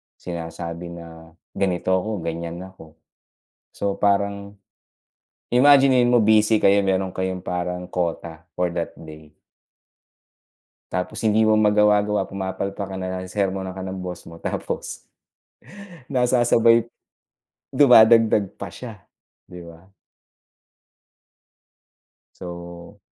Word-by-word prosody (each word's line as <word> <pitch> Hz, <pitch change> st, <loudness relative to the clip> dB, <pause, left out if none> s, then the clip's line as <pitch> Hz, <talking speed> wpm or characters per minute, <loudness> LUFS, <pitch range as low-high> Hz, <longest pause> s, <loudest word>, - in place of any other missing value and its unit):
Sinasabi 85 Hz, 0 st, -7 dB
na 80 Hz, -1 st, -12 dB, 0.2 s
ganito 95 Hz, -2 st, -1 dB
ako, 95 Hz, 0 st, -1 dB
ganiyan 85 Hz, +1 st, -5 dB
ako. 90 Hz, -4 st, -14 dB, 0.8 s
So 100 Hz, -1 st, -3 dB
parang, 100 Hz, 0 st, -1 dB, 0.9 s
imaginin 130 Hz, -1 st, +5 dB
mo 120 Hz, -, +5 dB
busy 110 Hz, 0 st, +3 dB
kayo, 100 Hz, 0 st, +4 dB
meron 95 Hz, -1 st, 0 dB
kayong 95 Hz, 0 st, -3 dB
parang 90 Hz, 0 st, -4 dB
quota 85 Hz, -2 st, -4 dB
for 90 Hz, 0 st, -1 dB
that 85 Hz, -, -3 dB
day. 80 Hz, -1 st, -13 dB, 1.6 s
Tapos, 90 Hz, +1 st, -3 dB
hindi 110 Hz, 0 st, +2 dB
mo 110 Hz, -, +3 dB
magawa-gawa, 105 Hz, -1 st, +3 dB
pumapalpak 100 Hz, +1 st, -5 dB
ka, 95 Hz, -, -7 dB
nasesermunan 95 Hz, 0 st, -3 dB
ka 95 Hz, -, -6 dB
ng 95 Hz, 0 st, -6 dB
boss 90 Hz, -1 st, -7 dB
mo. 85 Hz, 0 st, -13 dB
Tapos, -, -, -5 dB, 1.1 s
nasasabay, 120 Hz, -2 st, +3 dB, 0.8 s
dumadagdag 115 Hz, -6 st, +5 dB
pa 100 Hz, -, -5 dB
siya, 110 Hz, 0 st, -10 dB, 0.5 s
'di 90 Hz, -1 st, -11 dB
ba? 85 Hz, +3 st, -15 dB, 2.5 s
So 85 Hz, -1 st, -10 dB
95 Hz, 100 wpm, -22 LUFS, 85-105 Hz, 2.5 s, imaginin